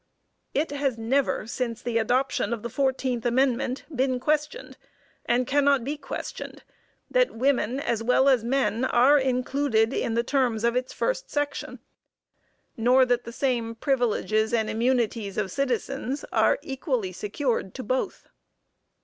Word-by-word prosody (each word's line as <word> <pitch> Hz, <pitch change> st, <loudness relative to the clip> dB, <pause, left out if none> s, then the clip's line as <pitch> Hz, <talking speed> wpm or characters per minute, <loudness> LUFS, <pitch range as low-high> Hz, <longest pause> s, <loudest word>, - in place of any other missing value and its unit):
It 295 Hz, +1 st, 0 dB
has 280 Hz, -4 st, -1 dB
never, 245 Hz, +1 st, 0 dB
since 235 Hz, 0 st, -3 dB
the 235 Hz, -2 st, -1 dB
adoption 250 Hz, +2 st, 0 dB
of 230 Hz, -2 st, -5 dB
the 235 Hz, -, -5 dB
fourteenth 260 Hz, -3 st, 0 dB
amendment, 255 Hz, +1 st, +1 dB
been 260 Hz, 0 st, +1 dB
questioned, 300 Hz, -, -1 dB, 0.5 s
and 245 Hz, +1 st, +2 dB
cannot 280 Hz, -1 st, +3 dB
be 285 Hz, +5 st, -2 dB
questioned, 280 Hz, -2 st, -7 dB, 0.5 s
that -, -, +2 dB
women 255 Hz, 0 st, +1 dB
as 235 Hz, -5 st, -1 dB
well 250 Hz, +3 st, +3 dB
as 260 Hz, -5 st, +4 dB
men 245 Hz, -1 st, 0 dB
are 260 Hz, +3 st, +5 dB
included 255 Hz, -3 st, +1 dB
in 225 Hz, -, -1 dB
the 235 Hz, -, +2 dB
terms 245 Hz, -4 st, 0 dB
of 235 Hz, +1 st, +2 dB
its 255 Hz, 0 st, -1 dB
first -, -, -2 dB
section, 290 Hz, -1 st, -3 dB, 0.9 s
nor 250 Hz, +3 st, +4 dB
that 245 Hz, -1 st, 0 dB
the 235 Hz, -, -6 dB
same 235 Hz, -3 st, -1 dB
"privileges 225 Hz, -3 st, +1 dB
and 220 Hz, -1 st, 0 dB
immunities 230 Hz, -4 st, 0 dB
of 195 Hz, -3 st, -1 dB
citizens" 270 Hz, +2 st, -2 dB
are -, -, +3 dB
equally 260 Hz, -, -2 dB
secured 210 Hz, -, -2 dB
to 260 Hz, -, -5 dB
both. 255 Hz, +4 st, -2 dB
250 Hz, 140 wpm, -26 LUFS, 230-275 Hz, 0.9 s, are